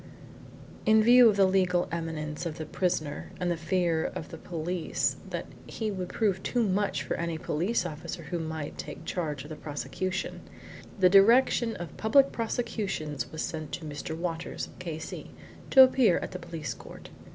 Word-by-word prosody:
In 220 -1 +5
view 245 +1 +8
of 210 - +2
the 195 -1 +5
legal 185 -2 +2
eminence 160 -1 -3
of 160 - -6
the 155 - -4
prisoner 155 -3 -2
and 180 -1 0
the - - +1
fear 165 0 +1
of 155 - -5
the 165 - -8
police 170 0 -2
that - - -4 0.2
he 220 -2 -3
would 185 -2 -4
prove 200 -4 0
too 240 +3 0
much 190 -7 0
for - - -2
any 170 -1 -2
police 175 +7 0
officer 165 +1 -6
who 170 +4 -3
might 160 -2 -5
take 165 - -7
charge 150 -7 -3
of 150 - -11
the - - -4
prosecution, 150 +7 -4 0.6
the 185 - +7
Direction 225 +4 +5
of 175 -3 -7
Public 270 +5 +4
Prosecutions 200 - -2
sent 155 0 -4
Mr. 150 +2 -5
Walters, 165 -1 -4
K.C., 160 -3 -6 0.4
to 265 - +10
appear 255 -7 +4
at - - -4
the 180 - -6
police 165 -3 -5
court. - - -12
175 Hz, 165 wpm, -29 LUFS, 160-200 Hz, 0.6 s, to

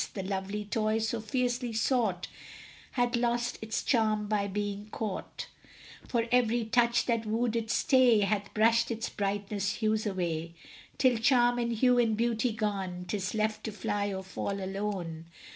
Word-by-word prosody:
The 195 - -3
lovely 195 +2 -3
toy 215 +1 0
so 225 +1 -1
fiercely 245 +1 -1
sought 220 -5 +1 0.7
Hath 245 -1 +1
lost 240 0 0
its 220 0 -2
charm 215 -4 +2
by 205 -1 0
being 205 +1 -3
caught, 210 -3 -5 0.6
For 235 -2 0
every 240 -2 +3
touch 235 +1 +3
that 230 -2 0
wooed 230 +1 0
its 225 -1 0
stay 250 -5 +5
Hath 200 0 0
brushed 230 +2 +4
its 225 -1 -3
brightest 200 0 -2
hues 215 -1 0
away, 170 -4 -2 0.4
Till, 255 -3 +4
charm 245 0 +4
and 235 0 0
hue 245 +2 +3
and 225 -3 +2
beauty 235 +1 +1
gone, 195 -5 -3
'Tis 200 0 -2
left 215 0 -1
to 220 - -3
fly 205 0 -2
or 190 0 -4
fall 195 +1 -4
alone. 190 -4 -4
215 Hz, 155 wpm, -30 LUFS, 200-235 Hz, 0.7 s, stay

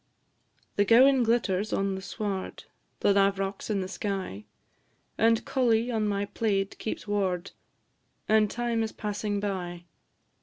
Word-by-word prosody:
The 205 - +5
gowan 255 +5 +6
glitters 220 -4 +1
on 195 0 0
the 190 - -5
sward, 195 -1 -4 0.4
The 200 - +4
lav'rock's 195 0 +1
in 200 -2 0
the 185 - -3
sky, 190 - -4 0.7
And 225 0 +3
collie 240 -2 +2
on 220 -2 0
my 200 0 0
plaid 200 -1 -1
keeps 220 - -5
ward, 195 -3 -1 0.8
And 215 -1 +4
time 235 0 -1
is 220 -1 -2
passing 205 -1 -2
by. 180 -4 -4
205 Hz, 130 wpm, -28 LUFS, 195-225 Hz, 0.8 s, gowan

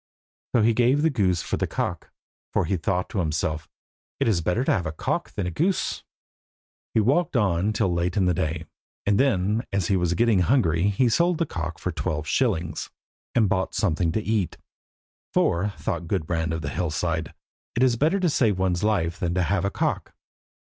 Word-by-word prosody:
So 115 - +5
he 115 +1 +4
gave 125 +6 +3
the 160 - +3
goose 95 -9 +1
for - - -2
the - - -1
cock, - - -3 0.4
for 100 - +1
he 95 - 0
thought 90 +1 -1
to 100 - -2
himself 80 -1 -1 0.5
"It - - +1
is 100 -7 +2
better 90 +9 0
to - - +1
have 90 -3 0
a - - -2
cock 80 - -3
than 100 - -2
a 90 - -2
goose." 180 - 0 0.9
He - - +5
walked 140 +6 +2
on 100 -2 +2
till 100 -4 +1
late 85 +2 -1
in 95 - +3
the 90 - +3
day, 80 -1 -2 0.4
and 100 0 +2
then 110 -4 +2
as 100 -3 0
he 100 - +3
was 90 -1 +1
getting 115 0 +3
hungry 90 - +2
he 110 +5 +2
sold 170 +8 +2
the 165 - +1
cock 80 - -4
for - - -3
twelve 75 0 -3
shillings, 90 -7 0 0.5
and 110 -3 +4
bought 95 0 -1
something 85 -4 +1
to 110 - -1
eat, 105 -5 -1 0.8
for, 90 +5 +2
thought 85 0 -3
Gudbrand 80 -3 -1
of 80 -1 -3
the 70 - -2
Hillside 80 0 -2 0.4
"It 120 - +3
is 125 -2 +4
better 160 - +2
to 180 - +3
save 110 -9 +2
one's 95 -1 0
life 90 -6 0
than 90 -1 -1
have 90 +1 +1
a - - +1
cock." - - -2
95 Hz, 195 wpm, -25 LUFS, 85-110 Hz, 0.9 s, So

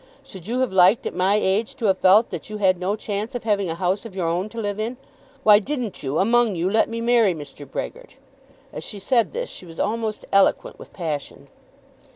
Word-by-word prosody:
Should 190 -1 -11
you 245 +3 -1
have 260 - 0
liked 190 +4 +5
at - - -3
my 190 +3 +2
age 210 +1 0
to 230 - -4
have 190 -2 +2
felt 205 +5 +5
that 175 +2 -6
you 215 - -5
had 185 -3 +2
no 190 +3 -1
chance 215 +3 -4
of 245 - -4
having 200 -4 0
a 165 - -2
house 185 +3 -1
of 225 -5 -10
your 185 -3 -2
own 175 +5 -1
to 230 - -7
live 205 -1 -3
in? 230 +3 -3 0.5
Why 210 -3 +7
didn't 245 -2 -4
you, 135 +2 -2
among 230 0 +3
you, 175 +3 -1
let 220 +1 +2
me 230 0 -4
marry 230 -6 +3
Mr. 145 -2 -10
Brehgert?" - - -6 0.6
As - - -6
she 210 - -6
said 230 +3 +1
this - - -4
she 185 - -9
was 165 -1 -12
almost 220 -1 -2
eloquent 195 0 +2
with - - -12
passion. 155 -6 -5
205 Hz, 220 wpm, -23 LUFS, 185-230 Hz, 0.6 s, Why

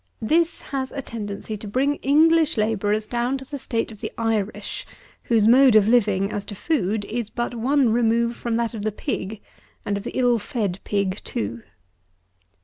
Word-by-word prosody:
This 330 +8 +2
has 265 -1 -2
a 275 - -5
tendency 210 -2 -5
to 210 - -8
bring 270 +7 +1
English 315 +1 +4
labourers 215 0 +1
down 240 +4 -1
to 265 - -9
the 285 +1 -6
state 230 -3 -2
of 215 - -13
the - - -4
Irish, 220 -3 -2 0.4
whose 225 -3 +3
mode 255 0 +7
of 215 -1 +6
living, 210 -4 +3
as 205 - -3
to 205 - -7
food, 210 - -1
is 230 0 -3
but 240 +1 -3
one 255 +1 +2
remove 235 0 +2
from 235 -1 -2
that 235 0 0
of 220 - -5
the 215 +1 -1
pig, 205 +1 -4 0.4
and 200 - -1
of 200 - -6
the - - -5
ill 245 -2 +3
fed 205 -3 -3
pig 200 -1 -1
too. 115 +2 -4
225 Hz, 180 wpm, -23 LUFS, 205-255 Hz, 0.4 s, mode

